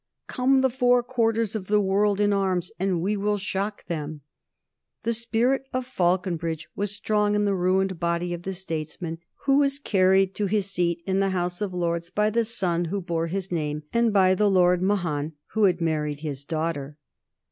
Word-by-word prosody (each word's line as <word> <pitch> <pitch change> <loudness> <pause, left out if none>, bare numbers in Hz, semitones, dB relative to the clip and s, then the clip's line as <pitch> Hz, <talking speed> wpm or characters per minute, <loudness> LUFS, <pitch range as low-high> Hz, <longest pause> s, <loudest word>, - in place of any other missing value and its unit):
"Come 265 +1 +2
the 265 -1 +2
four 245 -1 +3
quarters 230 -3 0
of 195 -4 -4
the 210 0 +3
world 200 +1 +2
in 205 0 +3
arms 185 -3 0
and 185 -3 0
we 205 +3 +1
will 205 +1 0
shock 200 +1 -3
them." 155 -3 -5 0.8
The 230 - +1
spirit 235 +4 0
of 255 0 -1
Faulconbridge 175 -7 -1
was 205 0 -2
strong 210 0 0
in 205 0 +2
the 200 - +2
ruined 185 0 +1
body 170 +1 -1
of 170 - -5
the 190 +2 -4
statesman 165 -1 -5 0.3
who 275 0 +4
was 280 -1 +2
carried 190 -6 +3
to 205 - -1
his 205 0 +1
seat 170 -2 0
in 190 0 0
the 195 0 +2
House 180 0 -2
of 205 -2 -1
Lords 170 -1 -2
by 210 +3 +1
the 230 +1 +1
son 175 -6 0
who 195 +5 -2
bore 170 -2 -2
his 190 +2 -4
name 150 -3 -2
and 235 -1 +3
by 190 -2 +4
the 205 +2 +2
Lord 180 -2 +4
Mahon 170 -6 0 0.2
who 220 -1 +3
had 180 -2 +2
married 150 -3 -1
his 140 -3 -5
daughter. 155 -2 -3
190 Hz, 190 wpm, -25 LUFS, 170-210 Hz, 0.8 s, who